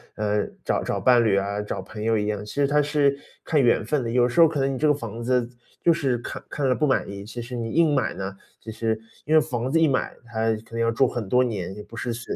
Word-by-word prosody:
呃， 105 -1 0 0.2
找 - - 0
找 - - -2
伴 120 -2 +5
侣 100 -3 +3
啊， 100 +1 -1
找 105 - -4
朋 110 -1 -9
友 110 0 +2
一 105 - -1
样， 105 -1 -3
其 - - -9
实 140 -1 +2
它 150 +1 +3
是 145 -1 +2 0.3
看 150 -3 +2
缘 120 - +3
分 150 -4 0
的。 115 - -3
有 125 0 +3
时 145 - -1
候 165 - +9
可 150 -2 -3
能 135 0 +1
你 - - -3
这 155 - +3
个 150 - +5
房 115 -4 -6
子 125 -1 +1 0.3
就 170 - +5
是 135 -6 0
看 - - -7
看 140 -3 -1
了 125 - +3
不 150 - +1
满 135 - +1
意， 100 0 -7
其 120 +3 -7
实 125 +1 -7
你 115 -1 -3
硬 165 -3 +3
买 130 - 0
呢， 95 0 -5 0.3
其 110 - -7
实 110 0 -1 0.3
因 155 - 0
为 155 - +7
房 125 +1 -3
子 165 - +3
一 160 - +5
买， 130 -2 -1
它 115 -1 -2
肯 110 0 -4
定 115 +1 -6
要 115 0 +2
住 130 +3 +3
很 120 -5 -4
多 125 +1 +4
年， 95 -6 -3
也 105 - -8
不 115 - -12
是 120 - -2
随 120 +1 -5
120 Hz, 305 characters per minute, -24 LUFS, 110-135 Hz, 0.3 s, 候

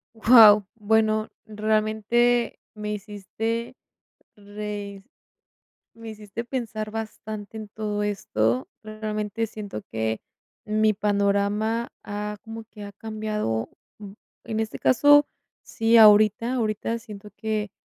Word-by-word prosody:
Guau. 220 -2 +8
Bueno, 215 0 +1 0.2
realmente 220 +3 +1 0.2
me 210 0 -4
hiciste 215 +3 -4 0.6
reis 205 -1 -7 0.9
me 230 0 -9
hiciste 215 +1 -7
pensar 225 -4 -4
bastante 220 -1 -7
en 215 - -7
todo 210 0 -3
esto. 125 - -1 0.2
Realmente 215 0 -3
siento 205 - -7
que 110 0 -2 0.4
mi 215 0 +2
panorama 205 +3 0
ha, 210 0 -5
como 225 0 -8
que 210 -2 -11
ha 200 - -8
cambiado, 210 - -3 0.7
en 220 -1 -3
este 220 -1 -3
caso 290 +3 +5 0.4
sí, 225 +1 +2
ahorita, 215 +2 +6
ahorita 230 -1 -1
siento 210 -2 -11
que 215 -2 -3
215 Hz, 105 wpm, -24 LUFS, 205-225 Hz, 0.9 s, Guau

